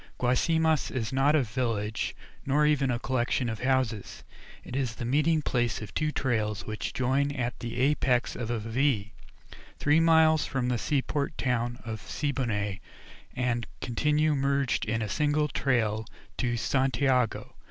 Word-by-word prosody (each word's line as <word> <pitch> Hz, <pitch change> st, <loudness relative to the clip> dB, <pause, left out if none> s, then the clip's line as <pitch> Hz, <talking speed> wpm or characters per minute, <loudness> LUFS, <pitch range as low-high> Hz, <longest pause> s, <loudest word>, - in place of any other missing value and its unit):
Guasimas 160 Hz, +5 st, +2 dB
is 130 Hz, -1 st, -3 dB
not 140 Hz, +3 st, +3 dB
a 150 Hz, -, +3 dB
village, 110 Hz, -2 st, -2 dB, 0.3 s
nor 145 Hz, +2 st, +2 dB
even 145 Hz, -3 st, +2 dB
a 120 Hz, -, +1 dB
collection 125 Hz, 0 st, 0 dB
of 110 Hz, -2 st, -4 dB
houses; 125 Hz, -5 st, -1 dB, 0.4 s
it -, -, -8 dB
is 130 Hz, -4 st, -1 dB
the 120 Hz, -, -5 dB
meeting 150 Hz, +5 st, +2 dB
place 120 Hz, -4 st, 0 dB
of 105 Hz, -2 st, -8 dB
two 155 Hz, -1 st, 0 dB
trails 110 Hz, -7 st, -1 dB
which 110 Hz, 0 st, -4 dB
join 135 Hz, +3 st, +1 dB
at 125 Hz, -3 st, -3 dB
the 120 Hz, 0 st, -5 dB
apex 130 Hz, -3 st, +2 dB
of 120 Hz, -2 st, -4 dB
a 120 Hz, -, 0 dB
V, 115 Hz, -1 st, 0 dB, 0.7 s
three 150 Hz, +2 st, +3 dB
miles 160 Hz, -1 st, +5 dB
from 130 Hz, -3 st, -1 dB
the 120 Hz, -2 st, 0 dB
seaport 145 Hz, +2 st, -1 dB
town 120 Hz, -2 st, -1 dB
of 110 Hz, -3 st, -5 dB
Siboney, 115 Hz, -10 st, -2 dB, 0.6 s
and 120 Hz, -2 st, -1 dB
continue 150 Hz, +5 st, +1 dB
merged 140 Hz, -1 st, +1 dB
in 115 Hz, +1 st, -1 dB
a -, -, -2 dB
single 150 Hz, +9 st, +1 dB
trail 115 Hz, -6 st, 0 dB, 0.3 s
to 120 Hz, -1 st, -1 dB
Santiago. 130 Hz, -1 st, +1 dB
130 Hz, 150 wpm, -28 LUFS, 115-145 Hz, 0.7 s, miles